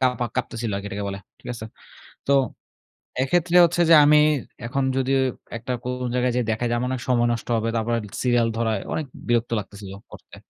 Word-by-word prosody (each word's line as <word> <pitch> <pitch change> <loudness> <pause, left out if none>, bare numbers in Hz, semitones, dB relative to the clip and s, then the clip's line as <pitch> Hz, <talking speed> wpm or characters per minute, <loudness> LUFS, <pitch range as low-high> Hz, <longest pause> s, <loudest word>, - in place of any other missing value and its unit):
কাপা 125 -2 +1
কাঁপতেছিল 115 -2 -2
আরকি 100 +1 -5
এটাকে 100 0 -4
বলে, 100 0 -5 0.2
ঠিক - - -12
আছে? 110 - -7 0.6
তো - - +4 0.9
এক্ষেত্রে 175 +6 +2
হচ্ছে 175 +1 0
যে 165 - +8
আমি 150 +1 +6 0.5
এখন 135 +3 -1
যদি 135 0 0 0.5
একটা 125 +2 -4
কোন 125 0 -3
জায়গায় 125 0 +1
যাই 125 - +1
দেখাই 110 +2 -1
যে - - 0
আমার 125 +1 -1
অনেক 130 -1 -3
সময় 120 -2 +3
নষ্ট 115 - -6
হবে। 115 +1 -1
তারপরে 115 +1 0
অনেক 105 -3 -10
সিরিয়াল 120 -2 +3
ধরায় 110 -3 0
অনেক 155 - -2 0.2
বিরক্ত 120 0 +1
লাগতেছিল 100 -1 -9 0.2
করতে। - - -13
120 Hz, 190 wpm, -23 LUFS, 115-130 Hz, 0.9 s, যে